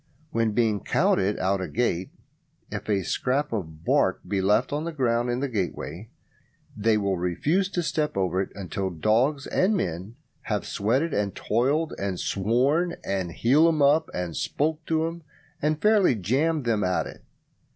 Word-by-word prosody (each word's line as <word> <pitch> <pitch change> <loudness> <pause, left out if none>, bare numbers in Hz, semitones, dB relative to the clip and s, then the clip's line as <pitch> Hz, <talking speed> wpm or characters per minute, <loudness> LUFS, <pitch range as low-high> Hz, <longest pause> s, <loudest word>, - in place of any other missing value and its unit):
When 115 -6 +1
being 110 -3 +2
counted 100 +2 +1
out 95 +1 0
at - - -2
a - - -10
gate, 95 -6 0 0.6
if - - -5
a 100 -2 +1
scrap 135 +8 -1
of 80 -6 -5
bark - - +2
be 100 -2 0
left 105 +8 +2
on 150 +2 -1
the 170 - -3
ground 120 -5 0
in 120 +1 -1
the 140 - 0
gateway, 100 - -4 0.7
they 110 +1 +2
will 100 -2 0
refuse 150 - 0
to 180 -3 -2
step 150 -6 -1
over 95 0 +1
it 95 - -4
until 95 0 -3
dogs 115 - +1
and 200 +3 +2
men 90 - -4 0.3
have 105 -3 -2
sweated 130 +10 0
and 100 -1 -1
toiled 140 +8 0
and 95 -2 -2
sworn 135 - +1
and 95 -3 -2
"heeled 155 +7 +4
'em 150 - +2
up", 155 +3 +4
and 90 -2 -4
"spoke 155 +2 -1
to 160 0 +1
'em", 165 +1 -5 0.4
and 155 +1 +1
fairly 210 - +5
jammed 135 - 0
them 110 -3 +1
at 90 0 +1
it. - - -10
115 Hz, 170 wpm, -26 LUFS, 95-150 Hz, 0.7 s, fairly